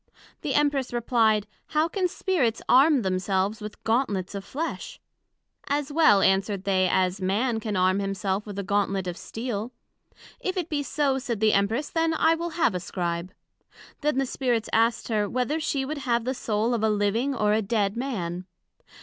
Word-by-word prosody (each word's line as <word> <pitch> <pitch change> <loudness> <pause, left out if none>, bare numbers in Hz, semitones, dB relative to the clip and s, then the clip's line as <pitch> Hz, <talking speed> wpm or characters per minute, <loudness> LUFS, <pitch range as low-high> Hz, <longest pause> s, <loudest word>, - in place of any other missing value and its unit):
The 290 -5 -2
Empress 285 -3 +1
replied, 225 -3 +2 0.2
How 310 +1 +1
can 370 +1 0
Spirits 315 - 0
arm 275 0 +5
themselves 190 +3 0
with 210 0 -8
gantlets 220 -6 0
of 200 -1 -5
Flesh? 315 +10 -5 0.7
As 290 0 -1
well, 250 -12 +5
answered 195 0 +2
they, 190 -2 +2
as 185 +1 +1
Man 220 +5 0
can 215 -1 -3
arm 185 +1 +3
himself 195 +1 -2
with 205 -1 -7
a 200 - -2
gantlet 195 -1 0
of 180 -1 -4
steel. 225 +2 -5 0.7
If 375 0 -3
it 350 -3 -2
be 295 -2 -1
so, 275 -1 0
said 240 -5 -3
the 215 0 +3
Empress, 220 +9 +1
then 325 -1 +1
I 320 +1 +4
will 340 +1 -3
have 235 - +3
a 180 - -2
Scribe. 175 0 -3 0.7
Then 300 -2 +1
the 270 - +2
Spirits 245 -4 -1
asked 230 +1 +2
her, 210 -2 0
Whether 255 +5 -1
she 275 -3 -1
would 300 +2 -4
have 240 -4 0
the 260 - 0
Soul 225 -1 -1
of 230 - 0
a 220 - +2
living 215 +6 +1
or 210 -3 +2
a 220 - +2
dead 205 -1 0
Man? 185 -9 -3
225 Hz, 180 wpm, -26 LUFS, 200-275 Hz, 0.7 s, arm